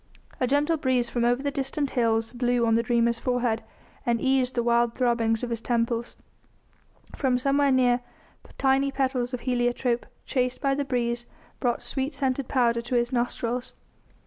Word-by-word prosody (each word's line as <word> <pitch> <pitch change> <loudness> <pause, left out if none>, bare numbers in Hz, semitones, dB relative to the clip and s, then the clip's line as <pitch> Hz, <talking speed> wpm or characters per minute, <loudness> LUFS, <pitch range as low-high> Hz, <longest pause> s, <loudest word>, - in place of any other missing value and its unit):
A 255 - +1
gentle 290 +5 +2
breeze 255 -4 0
from 240 - 0
over 245 +3 +2
the 285 - 0
distant 275 +1 -2
hills 225 -1 +1
blew 245 -1 +1
on 225 - +2
the 230 - +4
dreamer's 235 0 +1
forehead 245 -3 0 0.4
and 235 -1 +1
eased 265 -1 +1
the 240 - +1
wild 235 0 +2
throbbings 235 -3 +1
of 240 - -3
his 230 -1 -1
temples; 235 0 -1 1.0
from 260 -3 +1
somewhere 275 +2 +2
near 250 -1 +3 0.6
tiny 270 +1 +2
petals 260 -2 -1
of 250 -2 -4
heliotrope, 245 -1 0 0.2
chased 250 -2 -1
by 275 -1 +1
the 280 +1 -1
breeze, 240 -2 -1 0.3
brought 240 -1 0
sweet 275 +1 -2
scented 265 -1 -1
powder 235 -3 +2
to 240 +2 -3
his 240 +1 +1
nostrils. 245 0 -2
245 Hz, 165 wpm, -26 LUFS, 235-265 Hz, 1.0 s, the